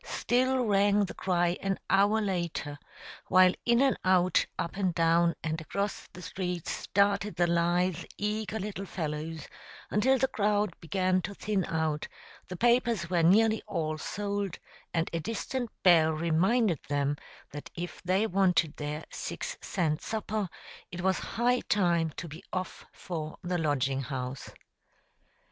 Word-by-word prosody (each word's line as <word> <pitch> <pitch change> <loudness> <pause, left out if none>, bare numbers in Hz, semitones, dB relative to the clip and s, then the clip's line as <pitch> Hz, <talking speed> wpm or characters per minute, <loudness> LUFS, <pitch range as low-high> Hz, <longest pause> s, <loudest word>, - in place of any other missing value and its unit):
still 255 +1 +1
rang 205 0 +3
the - - -7
cry 175 -1 +1
an 195 -1 0
hour 200 +3 +4
later, 170 -7 -2 0.5
while 185 0 +6
in 235 0 +5
and 270 - +3
out, 185 -1 +4
up 170 - -3
and 190 -4 0
down 170 +1 +3
and 160 0 -2
across 200 +5 -3
the 180 - -10
streets, 180 -1 -4
darted 200 0 +3
the 175 - +3
lithe, 175 +1 +1
eager 215 +1 -2
little 200 -1 -5
fellows, 160 -1 -4 0.4
until 260 +6 +3
the 265 - +2
crowd 210 -4 +1
began 185 +1 +1
to 200 +4 -6
thin 205 -2 -1
out, 160 -2 -1 0.4
the 180 - -6
papers 235 -6 +2
were 175 -2 +3
nearly 220 +6 +4
all 160 -6 -2
sold, 200 +2 -3 0.3
and 165 -1 0
a 165 - 0
distant 230 +6 -3
bell 165 -4 +6
reminded 170 - +2
them 145 0 +1 0.4
that 145 0 -8
if 175 -1 -6
they 185 +4 +2
wanted 180 -6 +2
their 150 +1 -4
six - - -5
cent 160 -5 -1
supper, 215 -3 -2 0.4
it 175 -1 -5
was 190 0 +1
high 245 +2 +1
time 170 -5 +2
to 170 - -5
be 155 +2 -10
off 185 0 -5
for 155 -3 -6
the 180 0 -1
Lodging 135 -3 0
House. 130 -1 -5
185 Hz, 145 wpm, -29 LUFS, 165-205 Hz, 0.5 s, while